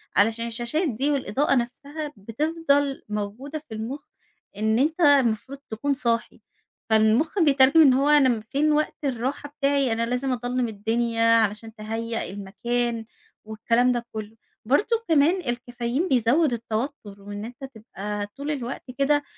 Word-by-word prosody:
علشان 225 Hz, +3 st, +2 dB
الشاشات 240 Hz, +9 st, -1 dB
دي 270 Hz, +5 st, 0 dB
والإضاءة 275 Hz, +1 st, +1 dB
نفسها 285 Hz, +5 st, -4 dB
بتفضل 285 Hz, +5 st, 0 dB
موجودة 210 Hz, +9 st, -4 dB
في -, -, -7 dB
المخ، 240 Hz, +7 st, -5 dB, 0.5 s
إن 220 Hz, +2 st, +1 dB
أنت 315 Hz, +6 st, +1 dB
المفروض 275 Hz, -3 st, +3 dB
تكون 280 Hz, +6 st, -1 dB
صاحي، 235 Hz, -3 st, -1 dB, 0.5 s
فالمخ 220 Hz, -, +3 dB
بيترجم 285 Hz, -1 st, +5 dB
إن 270 Hz, -4 st, +7 dB
هو 275 Hz, +3 st, +2 dB
أنا 295 Hz, -3 st, +6 dB
امم 230 Hz, -3 st, 0 dB
فين 280 Hz, +8 st, 0 dB
وقت 305 Hz, 0 st, 0 dB
الرّاحة 275 Hz, +2 st, -2 dB
بتاعي؟ 280 Hz, -3 st, +1 dB
أنا 230 Hz, +1 st, 0 dB
لازم 250 Hz, +3 st, -1 dB
أضلَّم 245 Hz, 0 st, -1 dB
الدِّنيا 230 Hz, +2 st, -1 dB
علشان 220 Hz, 0 st, 0 dB
تهيأ 225 Hz, +1 st, -4 dB
المكان 230 Hz, +4 st, -2 dB, 0.4 s
والكلام 230 Hz, +3 st, +1 dB
ده 240 Hz, -1 st, -2 dB
كلّه. 215 Hz, 0 st, -6 dB, 0.3 s
برضو 340 Hz, -, +2 dB
كمان 325 Hz, +4 st, +4 dB
الكافايين 245 Hz, +3 st, -2 dB
بيزوّد 260 Hz, +3 st, +3 dB
التوتّر 225 Hz, -2 st, -4 dB
وإن 205 Hz, +1 st, -7 dB
أنت 245 Hz, +4 st, -11 dB
تبقى 210 Hz, -5 st, -6 dB
طول 280 Hz, +8 st, -5 dB
الوقت 255 Hz, -3 st, -4 dB, 0.2 s
كده 290 Hz, +1 st, +3 dB
245 Hz, 140 wpm, -24 LUFS, 225-285 Hz, 0.5 s, إن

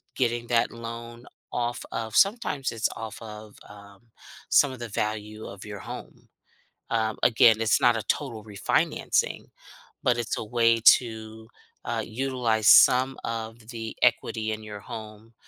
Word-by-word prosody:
getting 120 Hz, -2 st, -1 dB
that 115 Hz, -1 st, +2 dB
loan 115 Hz, +1 st, -8 dB, 0.3 s
off 120 Hz, -1 st, -2 dB
of 110 Hz, -1 st, -4 dB
sometimes 195 Hz, -, +2 dB
it's 115 Hz, -, 0 dB
off 110 Hz, -1 st, -7 dB
of, 105 Hz, -1 st, -10 dB
um, 100 Hz, -1 st, -14 dB, 0.5 s
some 145 Hz, -, +5 dB
of 130 Hz, -, -9 dB
the 120 Hz, -, -5 dB
value 105 Hz, +1 st, -4 dB
of 95 Hz, -1 st, -10 dB
your 105 Hz, -1 st, -7 dB
home. -, -, -10 dB, 0.6 s
Um, 110 Hz, -1 st, 0 dB
again, 115 Hz, -1 st, +6 dB
it's 110 Hz, -2 st, +2 dB
not 120 Hz, -2 st, +4 dB
a 110 Hz, -, -4 dB
total 115 Hz, -7 st, -3 dB
refinancing, 105 Hz, -2 st, 0 dB, 0.6 s
but 120 Hz, -1 st, +2 dB
it's 120 Hz, -1 st, -2 dB
a -, -, -3 dB
way 115 Hz, +1 st, +2 dB, 0.2 s
to, 110 Hz, -2 st, -9 dB, 0.4 s
uh, 115 Hz, -1 st, -2 dB
utilize 120 Hz, -3 st, -1 dB
some 130 Hz, +1 st, +6 dB
of 115 Hz, 0 st, -5 dB
the 115 Hz, -2 st, -6 dB
equity 115 Hz, -2 st, +1 dB
in 110 Hz, 0 st, -4 dB
your 105 Hz, -1 st, -8 dB
home 110 Hz, +1 st, -10 dB
115 Hz, 145 wpm, -26 LUFS, 110-120 Hz, 0.6 s, again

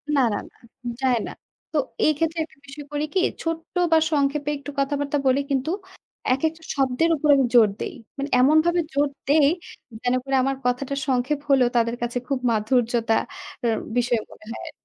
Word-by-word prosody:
না, 275 Hz, -, +4 dB
না, -, -, -1 dB
না। -, -, -30 dB, 0.4 s
যায় 255 Hz, -2 st, +3 dB
না। -, -, -6 dB, 0.4 s
তো 315 Hz, -, -1 dB, 0.3 s
এই 310 Hz, -, +5 dB
ক্ষেত্রে 325 Hz, +1 st, -1 dB
একটা 310 Hz, -, -14 dB
বিষয় 285 Hz, +1 st, -9 dB
করি 295 Hz, +1 st, -1 dB
কি 380 Hz, -, +3 dB, 0.2 s
ছোট্ট 330 Hz, +1 st, -4 dB, 0.2 s
বা 325 Hz, -, +7 dB
সংক্ষেপে 285 Hz, 0 st, +1 dB
একটু 280 Hz, +1 st, -8 dB
কথাবার্তা 285 Hz, +1 st, 0 dB
বলি, 260 Hz, +2 st, +4 dB
কিন্তু 270 Hz, +4 st, 0 dB, 0.6 s
একেকটা 320 Hz, +5 st, -1 dB
শব্দের 270 Hz, +4 st, +2 dB
উপর 300 Hz, 0 st, -1 dB
আমি 270 Hz, -2 st, +3 dB
জোর 225 Hz, -3 st, +7 dB
দেই। -, -, -4 dB, 0.2 s
মানে 280 Hz, +1 st, -3 dB
এমনভাবে 315 Hz, +6 st, +4 dB
জোর 285 Hz, +1 st, +3 dB, 0.2 s
দেই, 285 Hz, 0 st, +5 dB, 0.5 s
যেন 245 Hz, -, +1 dB
করে 270 Hz, 0 st, -1 dB
আমার 270 Hz, 0 st, 0 dB
কথাটা 255 Hz, +3 st, 0 dB
সংক্ষেপ 265 Hz, +2 st, +1 dB
হলেও 260 Hz, -3 st, +5 dB
তাদের 230 Hz, 0 st, +2 dB
কাছে 240 Hz, +1 st, -2 dB
খুব 275 Hz, -1 st, 0 dB
মাধুর্যতা 230 Hz, +1 st, +1 dB, 0.5 s
এর 225 Hz, -, +2 dB, 0.2 s
বিষয় 240 Hz, -1 st, +2 dB
মনে -, -, -15 dB
হয় -, -, -6 dB
আর -, -, -7 dB
275 Hz, 180 wpm, -24 LUFS, 250-300 Hz, 0.6 s, বা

